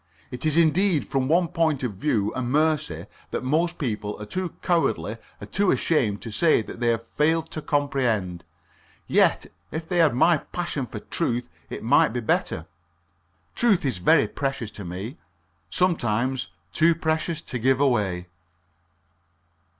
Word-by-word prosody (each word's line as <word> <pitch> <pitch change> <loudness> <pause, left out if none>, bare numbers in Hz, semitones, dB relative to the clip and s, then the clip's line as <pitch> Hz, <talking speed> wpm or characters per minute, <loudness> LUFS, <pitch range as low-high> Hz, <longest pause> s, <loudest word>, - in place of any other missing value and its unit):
It 125 +5 -2
is 155 +1 +2
indeed 170 0 +3
from 135 -1 0
one 170 +3 +3
point 155 -5 0
of 120 -4 -2
view 105 -1 0
a 130 - -2
mercy 145 - 0 0.2
that - - -3
most 165 +6 +1
people 105 -6 -3
are 105 - -6
too 180 - -4
cowardly 165 - 0 0.2
or - - -7
too 200 -1 +1
ashamed 110 -11 +1
to 115 - -6
say 155 0 +3
that 115 - -9
they 120 - 0
have 115 0 +1
failed 160 +6 0
to 155 - -5
comprehend. 125 - 0 0.6
Yet - - +3 0.2
if 160 0 -5
they 180 - -1
had 160 -7 +4
my 165 +6 +5
passion 160 -7 -4
for 110 - -7
truth 120 -5 -2 0.2
it - - -6
might 110 - +4
be 125 - -1
better. 110 - -1 0.9
Truth 210 -9 +2
is 125 -9 -1
very 150 - +4
precious 135 -6 -3
to 100 - -8
me 95 - -6 0.5
sometimes 130 - 0 0.3
too 165 +1 +4
precious 160 0 -1
to 125 - -4
give 130 +2 +2
away. 105 -10 +1
135 Hz, 155 wpm, -25 LUFS, 115-160 Hz, 0.9 s, my